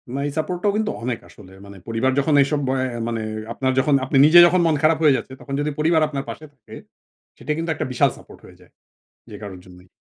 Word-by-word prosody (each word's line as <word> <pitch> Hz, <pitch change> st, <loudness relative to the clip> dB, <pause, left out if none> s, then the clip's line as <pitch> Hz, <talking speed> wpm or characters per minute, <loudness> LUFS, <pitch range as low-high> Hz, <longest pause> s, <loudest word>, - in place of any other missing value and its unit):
না -, -, -2 dB
এই 145 Hz, -, -4 dB
সাপোর্টটাও 180 Hz, +5 st, -1 dB
কিন্তু 215 Hz, 0 st, -1 dB
অনেক 120 Hz, -1 st, -3 dB
আসলে। 90 Hz, +2 st, -16 dB
মানে 100 Hz, 0 st, -12 dB
পরিবার 115 Hz, +4 st, 0 dB
যখন 150 Hz, +2 st, 0 dB
এইসব 145 Hz, +2 st, 0 dB
অ্যা 130 Hz, -2 st, -2 dB
মানে 115 Hz, -1 st, -3 dB, 0.3 s
আপনার 130 Hz, +2 st, -1 dB
যখন, 140 Hz, +2 st, +1 dB
আপনি 135 Hz, -, 0 dB
নিজে 165 Hz, +3 st, +7 dB
যখন 180 Hz, +1 st, +2 dB
মন 160 Hz, -, +2 dB
খারাপ 155 Hz, +1 st, +4 dB
হয়ে 145 Hz, -3 st, +5 dB
যাচ্ছে, 130 Hz, -, -8 dB
তখন 140 Hz, -, -8 dB
যদি 145 Hz, +1 st, -1 dB
পরিবার 160 Hz, +1 st, +2 dB
আপনার 140 Hz, -2 st, -5 dB
পাশে 155 Hz, -, -8 dB
থাকে, 130 Hz, -7 st, -15 dB, 0.6 s
সেটা -, -, -5 dB
কিন্তু 165 Hz, +1 st, -4 dB
একটা -, -, -4 dB
বিশাল 125 Hz, -, +2 dB
সাপোর্ট -, -, -16 dB
হয়ে -, -, -17 dB
যায়, -, -, -21 dB, 0.6 s
যে 105 Hz, -, -10 dB
কারোর 95 Hz, -3 st, -9 dB
জন্যই। 90 Hz, 0 st, -17 dB
135 Hz, 220 wpm, -21 LUFS, 115-155 Hz, 0.6 s, নিজে